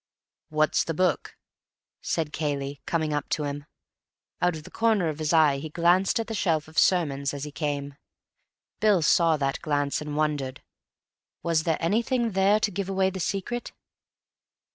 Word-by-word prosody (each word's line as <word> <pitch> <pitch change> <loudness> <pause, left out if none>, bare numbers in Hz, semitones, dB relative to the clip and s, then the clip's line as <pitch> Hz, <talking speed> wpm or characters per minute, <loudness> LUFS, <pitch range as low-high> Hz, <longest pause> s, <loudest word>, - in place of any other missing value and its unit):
"What's 155 0 +2
the 165 - -4
book?" 185 +2 0 0.6
said 160 -2 -2
Cayley, 140 -2 -3
coming 160 -2 0
up 145 -1 -2
to 150 - -1
him. 145 0 -4 0.8
Out 180 -1 +2
of 155 - -8
the - - -13
corner 220 -7 +2
of 155 0 -5
his 155 -1 -1
eye 155 -4 +4
he 155 +2 -6
glanced 175 +6 +2
at 225 - -1
the 225 - -5
shelf 165 -7 0
of 155 - 0
sermons 145 -6 +2
as 140 - -5
he 150 - -6
came. 145 -2 -3 0.9
Bill 205 -6 +3
saw 165 0 +4
that 135 -1 -1
glance 145 -3 0
and 150 -1 -5
wondered. 145 -4 -1 0.8
Was 165 -2 +1
there 160 -2 +1
anything 230 +6 +1
there 195 +2 +3
to 210 - +1
give 195 0 -3
away 190 0 +1
the 190 - -6
secret? 200 +7 -3
160 Hz, 165 wpm, -26 LUFS, 145-190 Hz, 0.9 s, eye